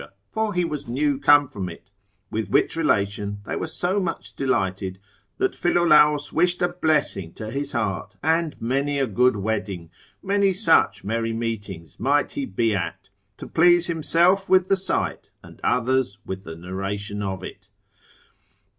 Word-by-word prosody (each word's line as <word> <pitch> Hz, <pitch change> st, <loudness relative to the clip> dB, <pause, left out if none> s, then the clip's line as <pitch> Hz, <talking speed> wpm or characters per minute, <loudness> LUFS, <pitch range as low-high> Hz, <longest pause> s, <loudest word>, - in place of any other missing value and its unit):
for 220 Hz, -3 st, -1 dB
he 180 Hz, -1 st, +2 dB
was 150 Hz, -3 st, -5 dB
new 140 Hz, +3 st, 0 dB
come 145 Hz, 0 st, +6 dB
from 100 Hz, -9 st, -5 dB
it; 95 Hz, +3 st, -13 dB, 0.4 s
with 110 Hz, -3 st, -2 dB
which -, -, +2 dB
relation 100 Hz, -9 st, 0 dB
they -, -, -3 dB
were -, -, -3 dB
so 180 Hz, +5 st, 0 dB
much 175 Hz, -4 st, -4 dB
delighted, 95 Hz, -7 st, -1 dB, 0.4 s
that 385 Hz, 0 st, 0 dB
Philolaus 150 Hz, -4 st, +3 dB
wished 175 Hz, +2 st, +2 dB
a 175 Hz, -, +3 dB
blessing 155 Hz, -, 0 dB
to 110 Hz, 0 st, -7 dB
his 140 Hz, +3 st, -3 dB
heart, 110 Hz, -6 st, -2 dB
and 160 Hz, 0 st, +1 dB
many 140 Hz, +4 st, 0 dB
a 135 Hz, -, +2 dB
good 125 Hz, +2 st, +2 dB
wedding, 100 Hz, -5 st, -3 dB, 0.3 s
many 200 Hz, 0 st, +2 dB
such 165 Hz, -, +3 dB
merry 115 Hz, +2 st, -1 dB
meetings 105 Hz, -7 st, -5 dB
might 140 Hz, +5 st, +2 dB
he 285 Hz, -2 st, -3 dB
be 115 Hz, -, 0 dB
at, 95 Hz, +1 st, -4 dB, 0.3 s
to -, -, -8 dB
please 175 Hz, +1 st, +4 dB
himself 175 Hz, +3 st, +2 dB
with 185 Hz, -1 st, +4 dB
the 195 Hz, -, +5 dB
sight, 190 Hz, -, -2 dB
and -, -, -15 dB
others 125 Hz, -4 st, +1 dB
with 95 Hz, 0 st, -6 dB
the 80 Hz, -, -7 dB
narration 95 Hz, +4 st, -5 dB
of 95 Hz, -2 st, -4 dB
it. 95 Hz, +1 st, -10 dB
130 Hz, 155 wpm, -23 LUFS, 100-165 Hz, 0.4 s, come